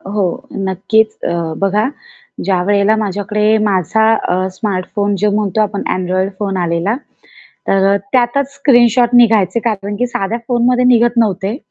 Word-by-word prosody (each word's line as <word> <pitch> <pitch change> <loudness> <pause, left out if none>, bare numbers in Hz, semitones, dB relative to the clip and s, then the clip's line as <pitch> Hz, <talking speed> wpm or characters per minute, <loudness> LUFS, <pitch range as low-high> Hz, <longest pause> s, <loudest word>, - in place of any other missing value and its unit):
अ, - - -12
हो. 205 -1 0 0.4
नक्कीच. 220 +4 +1 0.2
अ, - - -1 0.3
बघा 205 +4 +1 0.6
ज्यावेळेला 200 +3 +2
माझ्याकडे 210 +1 0
माझा 205 +2 +1 0.2
अ, 185 +1 0
स्मार्ट 185 -2 -3
फोन 205 0 +1
जो 210 +1 +1
म्हणतो 205 0 -1
आपण 210 -1 -1
Android 185 +1 -1
फोन 195 -2 -2
आलेला. 175 +3 -1 0.7
तर 195 0 +2
अ, - - +3 0.2
त्यातच 260 +2 +1
स्क्रीनशॉट 240 -3 +3
निघायचे, 225 -3 +3
कारण, 205 -3 -3
की 245 +4 0
साध्या 225 -1 -3
फोनमध्ये 245 0 +2
निघत 240 -1 +3
नव्हते 210 -1 0
210 Hz, 145 wpm, -15 LUFS, 195-235 Hz, 0.7 s, अ